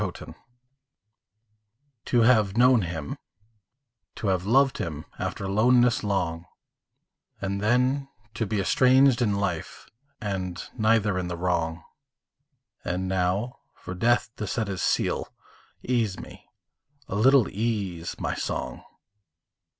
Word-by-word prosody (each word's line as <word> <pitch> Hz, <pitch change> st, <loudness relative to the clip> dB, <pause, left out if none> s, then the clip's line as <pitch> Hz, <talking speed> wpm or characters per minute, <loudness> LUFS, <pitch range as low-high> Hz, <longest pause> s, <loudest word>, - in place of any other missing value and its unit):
MONODY -, -, -5 dB, 1.7 s
To 120 Hz, -, +2 dB
have 110 Hz, -4 st, +3 dB
known 125 Hz, -1 st, +5 dB
him, 80 Hz, -5 st, -5 dB, 1.0 s
to 105 Hz, -, -2 dB
have 95 Hz, 0 st, 0 dB
loved 135 Hz, +3 st, +3 dB
him 75 Hz, -3 st, -4 dB
After 95 Hz, -, -3 dB
loneness 120 Hz, +4 st, +3 dB
long; 85 Hz, -5 st, -1 dB, 0.9 s
And 100 Hz, +1 st, -3 dB
then 125 Hz, +5 st, +2 dB, 0.3 s
to 110 Hz, -1 st, -2 dB
be 105 Hz, 0 st, -1 dB
estranged 130 Hz, +5 st, +4 dB
in 105 Hz, -4 st, +2 dB
life, 100 Hz, -5 st, -3 dB, 0.3 s
And 95 Hz, -4 st, -4 dB, 0.2 s
neither 110 Hz, -3 st, +2 dB
in 90 Hz, -, -3 dB
the 90 Hz, -1 st, -4 dB
wrong; 85 Hz, -2 st, -1 dB, 1.0 s
And 90 Hz, +1 st, -2 dB
now 95 Hz, +6 st, -1 dB, 0.2 s
for 95 Hz, -, -8 dB
death 115 Hz, +4 st, +1 dB
to 105 Hz, -, -4 dB
set 110 Hz, +1 st, -2 dB
his 95 Hz, -3 st, -3 dB
sealâ -, -, 0 dB, 0.6 s
Ease 115 Hz, -6 st, 0 dB
me, -, -, -12 dB, 0.6 s
a -, -, -6 dB
little 125 Hz, +3 st, +5 dB
ease, 100 Hz, -6 st, -3 dB
my -, -, -2 dB
song! -, -, -4 dB
100 Hz, 120 wpm, -26 LUFS, 90-120 Hz, 1.7 s, known